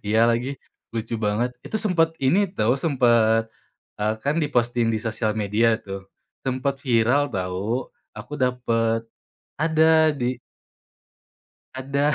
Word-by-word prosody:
Iya, 110 +2 +2
lagi. 120 +3 0 0.5
Lucu 115 0 -3
banget. 115 +4 0
Itu 220 - -3
sempat 170 -5 +3
ini 135 +9 +4 0.2
tahu, 115 +4 +3
sempat, 120 -7 +3 0.6
eee, 105 +1 0
kan 145 +2 +1
di-posting 120 -4 +1
di 110 - 0
sosial 110 -1 -1
media 110 +2 +2
tuh, 95 0 -7 0.4
sempat 130 +1 -1
viral, 120 +3 +3
tahu. 95 +7 -2 0.3
Aku - - -10
dapet 115 -3 +1 0.6
ada 160 0 +4
di 130 -3 -2 1.4
Ada. 140 +3 0
120 Hz, 120 wpm, -23 LUFS, 110-140 Hz, 1.4 s, ini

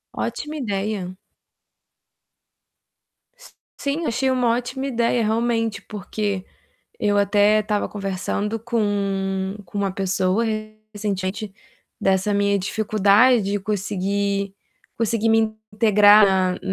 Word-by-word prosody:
Ótima 300 +1 -4
ideia. 200 -5 -3 2.2
S - - -16 0.2
sim, 295 +4 -2
achei 260 +2 0
uma 250 -2 +1
ótima 255 +2 -4
ideia, 235 -2 +1
realmente, 225 -1 0
porque 205 -1 -4 0.5
eu 205 -1 +1
até 205 +1 +4
estava 210 -1 -1
conversando 200 +2 -3
com 200 -4 -1
com 190 +4 -8
uma 200 -2 0
pessoa 190 +2 0 0.5
recentemente 200 -1 -3 0.5
dessa 195 +2 +1
minha 200 0 +2
dificuldade 215 +4 +3
de 200 +1 -1
conseguir 200 0 -2 0.4
conseguir 225 0 +1
me 220 -1 +3 0.2
integrar 210 -1 +6
na 185 -1 +1
205 Hz, 100 wpm, -22 LUFS, 195-225 Hz, 2.2 s, integrar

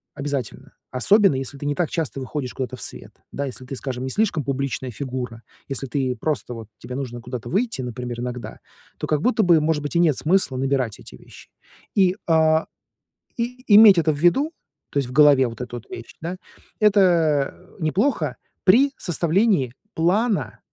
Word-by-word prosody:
обязательно, 140 -4 -5 0.2
особенно 195 +7 +4
если 135 +1 -5
ты 145 - -7
не 145 0 0
так 175 -1 0
часто 160 -5 -3
выходишь 130 -1 -4
куда-то 130 -3 -4
в - - -11
свет. - - -7 0.2
Да, 140 - -2
если 130 -1 -7
ты, 135 - -6
скажем, 130 -1 -5
не 130 - -3
слишком 195 -2 0
публичная 135 -2 -3
фигура, 125 -2 -5 0.3
если 135 0 -3
ты 130 0 -1
просто 125 0 -2
вот 115 -2 -8
тебе 125 +1 -7
нужно 125 -3 -5
куда-то 120 0 -6
выйти, 210 - 0
например, 125 -1 -5
иногда, 125 -3 -6 0.4
то - - -3
как 150 -1 +1
будто 235 +2 +2
бы, 170 -4 +5
может 150 -1 0
быть, 145 - -4
и - - +4
нет 165 -5 +4
смысла 170 -4 +1
набирать 130 -4 -1
эти - - -12
вещи - - -16 0.5
и, 185 -2 +4
а, 160 -1 +3 0.7
и. 245 +2 -3
И 210 - +5
иметь 210 -4 +9
это 160 -1 +3
в - - -6
виду, 260 - +3 0.4
то - - -3
есть 135 - -2
в - - -8
голове 140 -2 +6
вот 115 0 -8
эту 120 -1 -6
вещь, 115 - -9
да, 175 +3 -4 0.4
это, 210 -1 +5 0.5
а, 180 - -20
неплохо 190 - 0 0.3
при 255 +9 +6
составлении 175 - +1 0.2
плана. 200 +7 +1
145 Hz, 180 wpm, -22 LUFS, 125-180 Hz, 0.7 s, иметь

